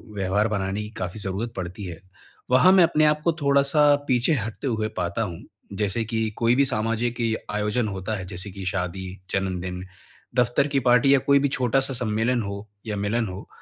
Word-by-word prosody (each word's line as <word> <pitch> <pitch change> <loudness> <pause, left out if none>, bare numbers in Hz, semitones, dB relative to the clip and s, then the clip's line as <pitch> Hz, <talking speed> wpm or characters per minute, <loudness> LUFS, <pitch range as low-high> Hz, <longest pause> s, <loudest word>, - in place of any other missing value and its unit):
व्यवहार 100 +2 +1
बनाने 100 -1 -2
की 105 - -6
काफ़ी 90 +3 -4
ज़रूरत 100 +4 -3
पड़ती 95 +2 -5
है। 85 -3 -7 0.5
वहाँ 180 +9 +6
मैं 190 -2 +7
अपने 155 -2 +3
आप 150 0 +2
को 170 - +3
थोड़ा-सा 140 +1 +4
पीछे 125 +4 +3
हटते 115 +1 -3
हुए 110 -3 0
पाता 90 +4 -1
हूँ। 90 -7 -4 0.3
जैसे 105 +2 -1
कि, 110 0 -1
कोई 115 +1 +3
भी 140 +2 +4
सामाजिक 115 0 -1
इ 115 -1 +1 0.2
आयोजन 105 +3 0
होता 100 +2 -3
है। 95 -3 -5
जैसे 95 +2 -6
की 95 0 -8
शादी, 95 0 -3 0.2
जन्मदिन, 90 -1 -2 0.5
दफ्तर 125 +3 +2
की 140 -1 +1
पार्टी 125 +3 +5
या 140 - +5
कोई 140 +2 +4
भी 140 - +2
छोटा-सा 135 +1 0
सम्मेलन 115 +1 0
हो 100 +1 -6 0.2
या 105 -2 -3
मिलन 110 +3 0
हो, 95 +1 -8
110 Hz, 190 wpm, -24 LUFS, 95-125 Hz, 0.5 s, मैं